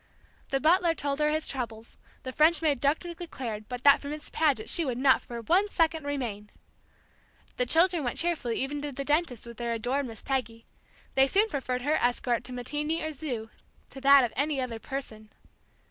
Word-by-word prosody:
The 270 - +1
butler 335 +3 +3
told 285 -1 -2
her 300 0 +3
his 310 +1 0
troubles, 230 -4 -6 0.3
the 260 - -5
French 310 +5 +4
maid 285 -5 +1
darkly 315 +5 0
declared 245 -11 -6
that 250 0 -5
but 280 - +7
for 280 - -7
Miss 300 +1 -7
Paget 285 -9 +1
she 340 - +1
would 255 -5 -2
not 265 0 +4
for 235 -1 -7
one 370 - +2
second 325 -3 +1
r - - -5
r - - 0
remain! 210 -7 -4 1.1
The 250 - +1
children 335 +2 +3
went 245 - -2
cheerfully 320 -9 -1
even 285 +2 -4
to 290 0 -4
the 275 +1 -5
dentist 295 -6 0
with 235 -1 -10
their 235 -1 -2
adored 255 +5 -1
Miss 225 -3 -10
Peggy; 235 -4 -3 0.5
they 270 0 +5
soon 415 +9 +3
preferred 255 - -3
her 300 +3 +2
escort 245 -1 0
to - - -6
matinee 295 +6 -2
or 315 - -2
zoo 255 -7 -5 0.4
to 270 - -10
that 275 0 +7
of 240 - -2
any 285 +2 0
other 245 -3 -3
person. 220 -5 -7
275 Hz, 200 wpm, -28 LUFS, 245-310 Hz, 1.1 s, but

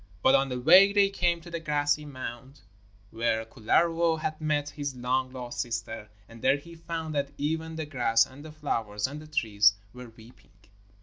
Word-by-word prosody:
But 130 - +5
on 135 0 +3
the 125 -1 -3
way 185 +9 +7
they 200 -1 +3
came 175 -3 0
to 170 - -12
the 170 - -3
grassy 150 -1 0
mound 130 0 -8 0.5
where 115 0 0
Kullervo 165 +9 +1
had 155 0 -4
met 145 -1 0
his 145 -2 -5
long 130 +1 -1
lost 125 -2 -5
sister, 115 -2 -5 0.2
and 115 0 -14
there 135 +2 +3
he 170 +4 -13
found 165 -1 -5
that 140 -1 -1
even 160 +2 -2
the 160 -1 -4
grass 125 -6 +2
and 135 +2 -14
the 155 - -9
flowers 115 -9 -2
and 145 +3 -5
the 155 - -12
trees 105 -9 +3 0.2
were 125 -1 -10
weeping. 115 +2 -18
145 Hz, 185 wpm, -28 LUFS, 120-160 Hz, 0.5 s, way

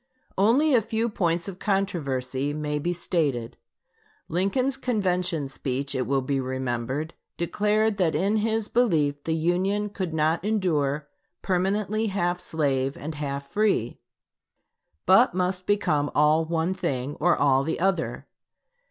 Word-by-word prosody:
Only 255 +10 +4
a 240 - +5
few 225 +2 -1
points 170 -4 0
of 190 -2 -7
controversy 145 -9 -1
may 150 0 -2
be 175 +4 -1
stated. 150 -9 -1 0.7
Lincoln's 200 +10 0
convention 180 - -1
speech, 135 0 -3
it 130 - -1
will 135 -1 +1
be 135 +1 0
remembered, 130 +3 -3 0.2
declared 210 +4 +1
that 170 -5 +1
in 195 +7 +1
his 220 0 0
belief 150 -12 +1
the 160 - 0
Union 185 +6 0
could 185 -4 -3
not 160 +2 +1
endure 155 -9 0 0.4
permanently 200 +4 0
half 180 -3 -1
slave 140 -5 -1
and 155 +2 -5
half 140 -2 -4
free, 205 - +1 1.1
but 190 +2 +5
must 180 0 -1
become 150 -8 +1
all 155 +2 +4
one 165 +2 0
thing 135 -6 -3
or 175 +3 +3
all 135 -2 +3
the 160 +3 -2
other. 185 -2 -1
170 Hz, 135 wpm, -25 LUFS, 145-200 Hz, 1.1 s, a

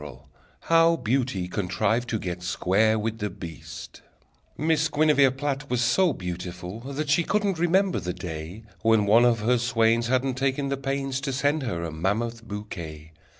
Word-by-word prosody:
_] 70 -3 -9 0.4
How 165 0 +4
Beauty 120 - -1
Contrived 105 +6 -1
to 110 - 0
Get 90 -3 -5
Square 100 +5 +2
with 110 +1 -3
the 105 - -2
Beast 85 -3 -9 0.6
Miss 155 0 +1
Guinevere 150 -2 +4
Platt 140 +2 -3
Was 125 -1 0
so 165 +9 +3
beautiful 90 -1 -6
that 140 +5 -4
She 170 +4 +4
couldn't 200 -2 0
remember 185 +2 +2
the 90 - -3
day 90 +3 -7 0.2
When 110 -2 +3
one 115 +4 +5
of 115 -3 +3
her 120 +3 +2
swains 115 -1 +2
Hadn't 130 +1 0
taken 135 +1 0
the 140 - -1
pains 135 0 -2
To 140 0 -2
send 145 +3 +1
her 95 -10 -3
a 85 - -4
mammoth 110 +8 -2
bouquet. 85 -8 -7
115 Hz, 165 wpm, -25 LUFS, 95-140 Hz, 0.6 s, one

